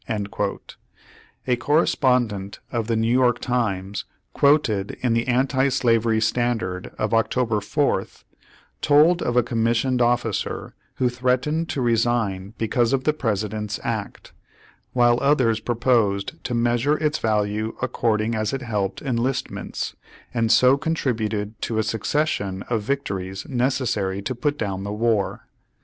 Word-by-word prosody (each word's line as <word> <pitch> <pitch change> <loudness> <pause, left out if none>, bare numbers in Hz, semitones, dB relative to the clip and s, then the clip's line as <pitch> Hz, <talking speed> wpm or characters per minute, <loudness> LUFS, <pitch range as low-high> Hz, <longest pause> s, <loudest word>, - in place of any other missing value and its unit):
A 125 - +3
correspondent 125 - +1
of 115 -2 -2
the 115 - +1
New 115 +1 +1
York 125 -1 +3
Times, 105 -4 -2 0.3
quoted 140 -9 +2
in 125 -2 +1
the 115 +1 0
Anti 130 +2 +2
Slavery 115 -3 +2
Standard 110 -5 -1
of 110 +1 -1
October 115 0 +1
4th, 140 +8 -1 0.6
told 155 +4 +5
of 120 0 0
a 125 - +5
commissioned 120 +2 +1
officer 120 0 0 0.2
who 125 - +1
threatened 130 +6 0
to 135 - -1
resign 115 -4 0
because 115 +2 +1
of 130 -1 +1
the 155 - +2
President's 105 -5 -2
act, - - -4 0.6
while 120 -1 +4
others 130 -6 +3
proposed 115 -5 0
to 125 - -1
measure 120 +5 +2
its 150 -1 0
value 105 0 0
according 115 -3 0
as 110 0 -1
it 135 -1 -3
helped 100 -5 -2
enlistments, 130 0 -2 0.4
and 115 -2 +1
so 130 +2 +6
contributed 110 -9 -2
to 115 - -2
a 110 - +2
succession 110 -4 -1
of 115 -2 +1
victories 100 -6 -3
necessary 120 -7 0
to 130 - -2
put 145 +4 -1
down 95 -6 -3
the 100 - -4
war. 110 -2 0
120 Hz, 130 wpm, -23 LUFS, 110-130 Hz, 0.6 s, so